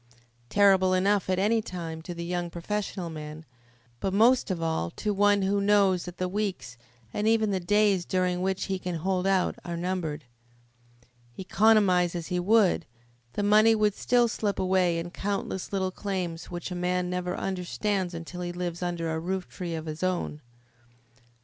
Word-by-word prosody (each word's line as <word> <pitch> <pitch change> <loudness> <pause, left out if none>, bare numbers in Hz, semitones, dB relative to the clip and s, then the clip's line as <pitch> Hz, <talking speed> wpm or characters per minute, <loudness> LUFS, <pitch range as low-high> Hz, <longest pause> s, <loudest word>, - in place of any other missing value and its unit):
Terrible 190 -2 +4
enough 195 +1 +2
at 185 - +2
any 215 +4 +2
time 165 -5 -6
to 175 +2 -7
the 170 0 -5
young 175 0 -2
professional 180 0 -4
man, 155 0 -8 0.5
but 195 0 -1
most 240 +4 +4
of 185 -3 -1
all 160 - -1
to 210 - -2
one 205 0 +3
who 200 +1 +1
knows 200 -3 +3
that 180 0 -8
the 185 - -1
weeks, 195 - -3 0.4
and 210 - -1
even 220 -2 +3
the 190 - 0
days 200 0 +2
during 180 0 0
which 190 +1 -1
he 190 -1 -2
can 180 -1 -4
hold 185 +3 -1
out 190 -2 +2
are 170 -1 -4
numbered. 170 -5 -3 1.1
Economise 190 -3 +3
as 170 -1 -5
he 180 -1 0
would, 195 -3 +3 0.5
the 205 - -2
money 215 +2 +5
would 210 -1 +2
still 245 +3 +2
slip 210 -3 -2
away 185 -2 +2
in 165 - -2
the 175 - -8
countless 195 -1 -3
little 190 -2 -1
claims 180 -4 -4
which 175 +1 -5
a - - -3
man 180 0 0
never 180 0 -2
understands 190 0 -2
until 170 +2 -7
he 175 0 -3
lives 175 -1 -4
under 170 -2 -2
a 160 - -3
rooftree 180 -1 -4
of 160 - -6
his 155 0 -6
own. 185 -4 -1 0.8
Dr. 120 -1 -31
185 Hz, 175 wpm, -27 LUFS, 175-200 Hz, 1.1 s, money